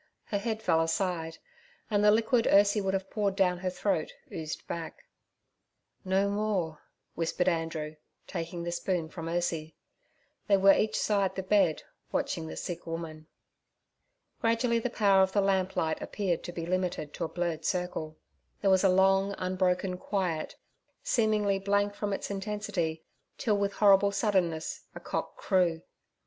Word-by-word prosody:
Her 205 - -2
head 220 0 -3
fell 165 -2 +3
aside, 165 -1 -1 0.5
and 205 -1 +2
the 210 - +7
liquid 225 +2 +3
Ursie 205 +1 +5
would 195 0 0
have 190 0 -4
poured 200 -3 0
down 180 -2 +2
her 185 0 -1
throat 185 -3 -1 0.2
oozed 155 -1 -5
back. 170 - -6 1.0
'No 190 +1 +2
more' 200 -6 -1 0.3
whispered 170 +2 -1
Andrew, 165 -3 -1 0.3
taking 170 +1 -5
the 170 - -3
spoon 175 -2 -1
from 165 -1 -7
Ursie. 165 -2 -2 0.7
They 200 -2 +5
were 195 +1 +7
each 215 0 +1
side 200 -3 +1
the 190 - -3
bed, 190 -5 +2 0.3
watching 80 - -1
the 80 0 -7
sick 175 - -5
woman. 160 -1 -6 1.1
Gradually 230 -1 +2
the 245 - -2
power 200 -4 +4
of 190 0 +2
the 205 - +3
lamplight 190 -4 0
appeared 185 -5 -1
to 175 - -5
be 165 -1 -5
limited 180 -4 -2
to 170 - -3
a - - -5
blurred 170 -2 -2
circle. 170 -3 -2 0.4
There 195 -2 +3
was 190 0 +4
a 195 - +5
long 195 +1 +3
unbroken 185 0 0
quiet, 180 -6 -2 0.5
seemingly 210 -4 +2
blank 200 +1 +1
from 205 0 -3
its 195 - -3
intensity, 195 -5 -3 0.3
till 215 -3 +1
with 200 0 0
horrible 200 -1 +5
suddenness 185 -6 0
a - - -6
cock - - -4
crew. 175 -4 +1
190 Hz, 155 wpm, -29 LUFS, 165-200 Hz, 1.1 s, the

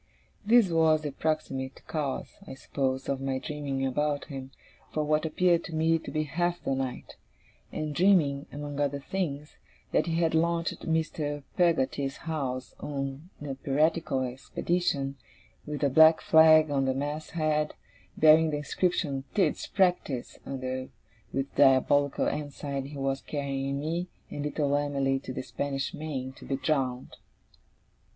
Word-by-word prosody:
This 225 0 +5
was 160 -2 +3
the 145 - -2
proximate 135 -3 -3
cause, 145 -4 -3
I - - -7
suppose, 135 0 -2
of 135 -1 -1
my 135 -1 -1
dreaming 140 -1 -3
about 145 +2 0
him, 135 -3 -7 0.4
for 155 - 0
what 155 +1 +1
appeared 170 +1 +2
to 160 - -6
me 165 +1 +3
to - - -8
be 155 0 0
half 175 +4 -1
the 135 - 0
night; 130 -2 -4 0.5
and 155 -1 -3
dreaming, 150 -6 +3
among 145 0 -6
other 145 -1 +1
things, 150 -2 -4 0.3
that 155 - +2
he 165 - 0
had 165 -1 +2
launched 170 +1 0
Mr. 155 -2 -1
Peggotty's 140 -5 +1
house 130 -6 -3
on 140 +3 -5 0.2
a 135 - -2
piratical 140 0 +1
expedition, 140 +2 -1 0.5
with 150 0 -4
a 140 - +4
black 160 +3 +7
flag 155 -1 +6
at 135 -1 +1
the 130 0 +1
masthead, 150 +1 -1 0.4
bearing 160 +1 +6
the 150 - -1
inscription 145 -3 -1
'Tidd's 185 -7 +1
Practice', 180 -9 0
under 130 -1 -4 0.4
which 135 +1 -2
diabolical 140 +1 +4
ensign 140 -2 -3
he 145 0 -9
was 135 0 -1
carrying 140 -1 -3
me 165 +4 -2 0.2
and 145 - -4
little 145 -1 0
Em'ly 140 -2 +1
to 130 - -7
the 130 - -4
Spanish 140 0 -3
Main, 135 -4 -4
to - - -13
be 135 - -1
drowned. 130 -4 -1
145 Hz, 145 wpm, -28 LUFS, 135-160 Hz, 0.5 s, black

